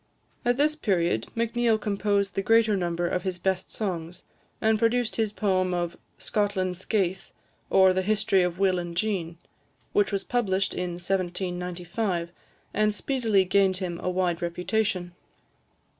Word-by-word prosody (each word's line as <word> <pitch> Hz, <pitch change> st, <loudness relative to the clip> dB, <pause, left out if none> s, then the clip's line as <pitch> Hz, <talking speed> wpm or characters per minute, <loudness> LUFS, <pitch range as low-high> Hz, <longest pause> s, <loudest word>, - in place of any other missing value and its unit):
At 245 Hz, +1 st, +2 dB
this 305 Hz, +2 st, +3 dB
period, 175 Hz, -, 0 dB
Macneill 230 Hz, 0 st, +2 dB
composed 200 Hz, -1 st, 0 dB
the 195 Hz, -, 0 dB
greater 225 Hz, +1 st, +4 dB
number 175 Hz, -2 st, -1 dB
of 180 Hz, -, -1 dB
his 185 Hz, 0 st, -3 dB
best 185 Hz, +1 st, -1 dB
songs, 175 Hz, -5 st, -4 dB, 0.4 s
and 220 Hz, -1 st, +2 dB
produced 235 Hz, +1 st, +1 dB
his 220 Hz, -2 st, +1 dB
poem 185 Hz, -4 st, +1 dB
of 175 Hz, -1 st, -2 dB, 0.2 s
"Scotland's 190 Hz, -4 st, -1 dB
Skaith, 190 Hz, -4 st, -1 dB, 0.4 s
or 190 Hz, -1 st, +6 dB
the 185 Hz, -, +1 dB
History 200 Hz, -1 st, +2 dB
of 180 Hz, -1 st, 0 dB
Will 190 Hz, -2 st, +2 dB
and 170 Hz, -1 st, -6 dB
Jean," 175 Hz, -5 st, -1 dB, 0.6 s
which 205 Hz, -, +3 dB
was 195 Hz, -1 st, -1 dB
published 195 Hz, -6 st, 0 dB
in 180 Hz, -1 st, -3 dB
1795, 180 Hz, 0 st, -2 dB, 0.4 s
and 215 Hz, 0 st, +2 dB
speedily 225 Hz, -7 st, +1 dB
gained 190 Hz, 0 st, +3 dB
him 175 Hz, -3 st, -4 dB
a -, -, -2 dB
wide 180 Hz, -2 st, 0 dB
reputation. 180 Hz, +1 st, -1 dB
190 Hz, 145 wpm, -26 LUFS, 180-215 Hz, 0.6 s, or